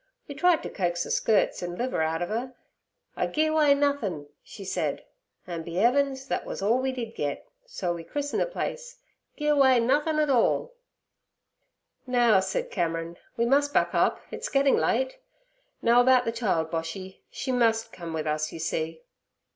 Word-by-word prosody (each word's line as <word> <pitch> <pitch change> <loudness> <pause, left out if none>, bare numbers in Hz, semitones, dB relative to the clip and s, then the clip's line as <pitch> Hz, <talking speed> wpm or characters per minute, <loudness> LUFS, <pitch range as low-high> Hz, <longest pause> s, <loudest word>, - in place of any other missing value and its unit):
We 285 - -6
tried 355 +2 +3
t' - - -5
coax 175 -3 -1
ther - - -6
skirts 215 -2 +2
an' 175 0 -4
liver 245 -4 -1
out 160 +2 0
ov 175 - -5
'er. 250 +4 -3 0.6
"I - - 0
gi'e 310 0 +1
away 300 -2 +4
nothin'," 280 - -1 0.2
she 195 - -11
said. - - -2 0.4
An' 170 -2 -5
be 165 +1 -8
'eavens! 265 +3 +2
thet - - -2
wus - - -6
all 215 +6 +2
we 265 0 0
did 235 -3 -5
git, 145 -7 -4 0.2
so 185 - -2
we 170 -1 -7
christened 290 - -2
the - - +1
place - - -5 0.4
"Gi'e 300 -1 -1
away 270 -4 +5
Nothin' 295 +6 +1
'All." 275 - +2 0.7
' - - -48
'Now' 240 -5 +4
said 190 0 -2
Cameron, 165 -1 -2 0.2
'we 235 - +2
must 285 +3 +2
buck - - +2
up; - - +2
it's - - -5
getting 275 0 +3
late. - - 0 0.6
Now 235 +1 +6
about 255 0 +4
the 230 - 0
child, 190 -9 -1
Boshy: 170 +3 -5
she 265 - -4
must 225 -2 +1
come 170 -2 -7
with 160 -1 -3
us, 155 0 -1
you - - -7
see.' 160 0 -3
235 Hz, 180 wpm, -27 LUFS, 175-280 Hz, 0.7 s, Now